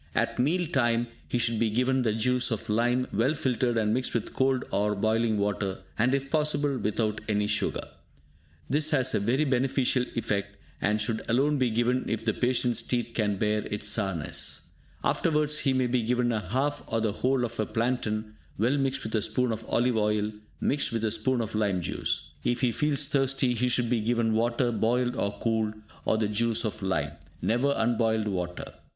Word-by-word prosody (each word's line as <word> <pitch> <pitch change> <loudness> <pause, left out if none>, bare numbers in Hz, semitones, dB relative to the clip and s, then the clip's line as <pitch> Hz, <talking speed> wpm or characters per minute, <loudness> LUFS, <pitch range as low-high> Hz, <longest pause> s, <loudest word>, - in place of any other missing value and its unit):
At - - 0
meal 170 +8 +2
time, 120 -5 +1 0.2
he - - -1
should 115 -2 +1
be 115 -1 +2
given 125 +4 +1
the 115 -3 +1
juice 125 +3 +1
of 115 -3 -3
lime, 120 +4 +2
well 125 +9 +2
filtered 125 -3 0
and 110 -1 +2
mixed 125 +1 -1
with 115 - -2
cold 130 -1 +1
or 105 +1 +1
boiling 110 +1 +1
water, 100 -1 -1 0.2
and 125 +4 +2
if 135 0 -3
possible, 145 -2 +1
without 105 0 -1
any 105 -1 +2
sugar. 105 0 -1 0.8
This 150 +4 +3
has 130 -4 +2
a - - +2
very 120 +9 +1
beneficial 130 -1 +1
effect, 100 -3 -2 0.3
and 105 +1 +1
should 110 0 -1
alone 140 +5 +2
be 130 -2 +2
given 120 +3 +1
if 115 0 -2
the 110 - +2
patient's 125 -2 +1
teeth 120 0 -1
can 105 -3 +1
bear 105 +1 +1
its 105 0 -2
sourness. 95 -8 -2 0.3
Afterwards, 150 -1 +1
he 135 - +1
may 130 -1 +2
be 125 0 +1
given 120 +1 +1
a 105 -5 -3
half 140 +5 0
or 115 - 0
the 110 -1 +1
whole 125 +4 +1
of 115 -1 -7
a 110 - 0
plantain, 110 -3 -1 0.2
well 125 +7 +2
mixed 135 0 -1
with 110 - -5
a 110 - +2
spoon 125 +3 0
of 110 0 -4
olive 120 0 +2
oil, 105 0 +1 0.3
mixed 140 -1 +1
with 115 -1 -2
a 110 - +1
spoon 120 +3 +1
of 110 -1 -4
lime 105 -4 +1
juice. 75 -3 -2
If 120 0 0
he 125 - +3
feels 150 +3 +1
thirsty, 135 -2 +1
he 125 +2 +1
should 120 -1 +1
be 120 -3 +2
given 115 0 +1
water 120 +2 +1
boiled 120 +2 +1
and 100 -3 -1
cooled, 110 -2 0 0.3
or 110 - +2
the 110 -1 +1
juice 115 +2 +1
of 110 0 -3
lime, 75 -7 -1 0.3
never 135 +5 +1
unboiled 110 -1 +1
water. 90 -3 -3
115 Hz, 195 wpm, -28 LUFS, 110-130 Hz, 0.8 s, This